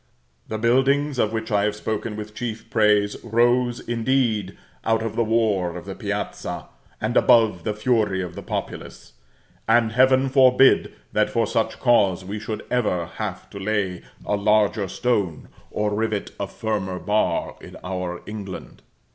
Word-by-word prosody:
The 110 - -3
buildings 135 +4 +2
of 105 - +2
which 110 0 -4
I 100 -1 +3
have 105 0 0
spoken 110 0 -3
with 105 0 -7
chief 115 0 -6
praise, 105 -2 +2
rose, 120 +1 +2
indeed, 115 -5 0 0.3
out 115 0 +1
of 110 -1 -4
the 115 - +2
war 105 -6 +1
of 90 - -9
the - - -5
piazza, - - -4 0.3
and - - -2
above 110 -7 +4
the 105 - -1
fury 105 -4 +1
of 90 -1 -7
the - - -7
populace: - - -6 0.5
and 110 0 +4
Heaven 130 +2 +4
forbid 130 0 +5 0.2
that - - +2
for - - +1
such - - -1
cause 100 -6 +3
we 105 +3 -5
should 110 0 -5
ever 105 -8 +1
have 100 -4 -4
to 100 - -8
lay 100 -3 -1 0.2
a 105 - +1
larger 105 0 +2
stone, 100 -7 -1 0.2
or 105 0 -1
rivet 110 -1 -1
a 100 - -2
firmer 100 -4 -3
bar, 105 +3 0
in - - -11
our 90 -1 -4
England! 100 -3 -8
110 Hz, 155 wpm, -23 LUFS, 100-120 Hz, 0.5 s, forbid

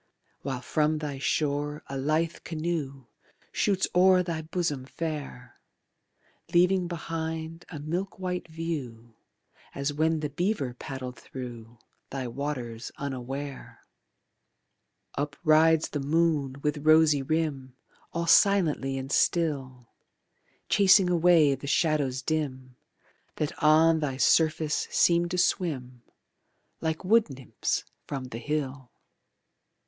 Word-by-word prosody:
While 130 -2 -4
from 155 +4 +1
thy 145 -3 -5
shore 145 +1 -1
a 135 - -7
lithe 155 +5 0
canoe 155 -5 -3 0.5
Shoots 195 -2 +1
o'er 185 0 +5
thy 165 -2 -3
bosom 155 -5 -2
fair, 145 -5 -6 0.9
Leaving 180 +1 +3
behind 165 0 -5
a 160 - -7
milk 170 +7 -4
white 180 -2 -3
view 140 -9 -5 0.6
As 140 +1 -2
when 160 +1 +1
the 150 - -2
beaver 160 - -1
paddled 130 0 -7
thru 120 -3 -9 0.3
Thy 130 -2 -4
waters 120 -3 -5
unaware. 135 0 -6 1.4
Up 145 0 -2
rides 160 0 +4
the 145 - -3
moon 145 -2 +1
with 150 0 0
rosy 155 -1 +5
rim 135 -3 -2 0.4
All 170 0 -2
silently 165 -7 +3
and 135 +1 -5
still, 135 -9 0 0.8
Chasing 190 -2 +5
away 170 -4 +5
the 135 +1 -6
shadows 140 -3 +1
dim 130 -5 -3 0.6
That 150 -1 -1
on 160 +1 +5
thy 140 -4 -2
surface 155 +1 +2
seem 170 0 +3
to 180 - -2
swim 135 - -1 0.8
Like 160 +2 -3
wood 220 0 +4
nymphs 130 -3 -3 0.2
from 135 -2 -4
the 120 -3 -7
hill. 140 -2 -3
150 Hz, 110 wpm, -27 LUFS, 135-165 Hz, 1.4 s, o'er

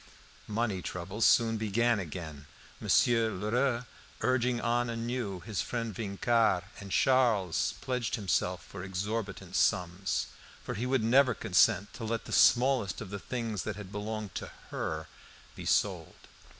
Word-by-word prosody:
Money 105 -3 -1
troubles 95 +6 -2
soon 115 -1 +4
began 110 +2 +1
again, 80 -4 -7 0.3
Monsieur 115 -2 +3
Lheureux 120 +5 0 0.4
urging 125 -1 +1
on 120 +1 +1
anew 115 -5 -3
his 100 +3 -3
friend 115 -3 -3
Vincart, 110 -1 +1 0.2
and 100 -1 -9
Charles 115 -7 +2
pledged 125 -3 -1
himself 90 -4 -1
for 95 -2 -8
exorbitant 100 +2 -4
sums; 90 +2 +1 0.4
for - - -4
he 120 +5 -2
would 130 -3 +1
never 125 +1 +4
consent 100 0 +3
to 115 - -8
let 115 0 -2
the - - -9
smallest 125 -6 +4
of 105 -4 -7
the 100 - -4
things 115 -3 -3
that 110 - -4
had 100 -2 -9
belonged 105 0 -4
to - - -5 0.2
HER - - -3 0.5
be - - -8
sold. - - +1
110 Hz, 140 wpm, -30 LUFS, 95-120 Hz, 0.5 s, soon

